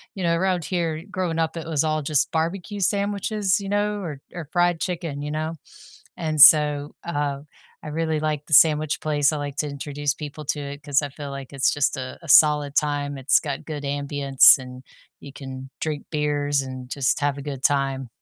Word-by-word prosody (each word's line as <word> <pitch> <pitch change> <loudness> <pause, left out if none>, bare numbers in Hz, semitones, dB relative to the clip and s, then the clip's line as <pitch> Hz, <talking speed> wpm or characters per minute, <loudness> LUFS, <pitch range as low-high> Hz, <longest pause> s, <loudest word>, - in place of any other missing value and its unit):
you 190 - -5
know, 170 -1 +1
around 180 -2 -1
here 165 -3 -3
growing 180 -4 -3
up, 165 0 -1
it 165 - -7
was 155 -2 0
all 155 -1 -1
just 145 -1 +1
barbecue 175 +5 -3
sandwiches, 200 0 0
you 195 - -7
know, 205 0 -1
or 150 -7 -7
or 165 -4 -8
fried 175 -1 +1
chicken, 165 -6 -4
you 150 - -5
know? 155 +1 -3 0.6
And 155 -3 -2
so, 150 -1 +7
uh, 145 -4 -3 0.4
I - - -7
really 160 0 -2
like 150 -1 -3
the - - -12
sandwich 155 0 +5
place. 150 -1 +1
I 155 - -3
like 145 -1 -6
to 150 - -2
introduce 145 0 -3
people 150 0 -8
to 150 +1 -1
it 140 0 -8
'cause 145 -1 +1
I 145 - -3
feel 140 +1 -9
like 135 0 -9
it's 135 -1 +1
just 145 0 0
a 130 -1 -7
a 165 - -13
solid 150 -1 +5
time, 145 -1 -1
it's 135 +1 +4
got 140 -3 -5
good 150 -2 -6
ambiance, 140 -1 +5
and 125 0 -11 0.4
you 140 - -11
can 135 -1 -9
drink 150 -2 -4
beers 145 -2 -1
and 130 -1 -8
just 135 0 0
have 145 -1 -1
a - - -7
good 135 -2 -7
time. 135 -2 0
150 Hz, 200 wpm, -23 LUFS, 140-165 Hz, 0.6 s, so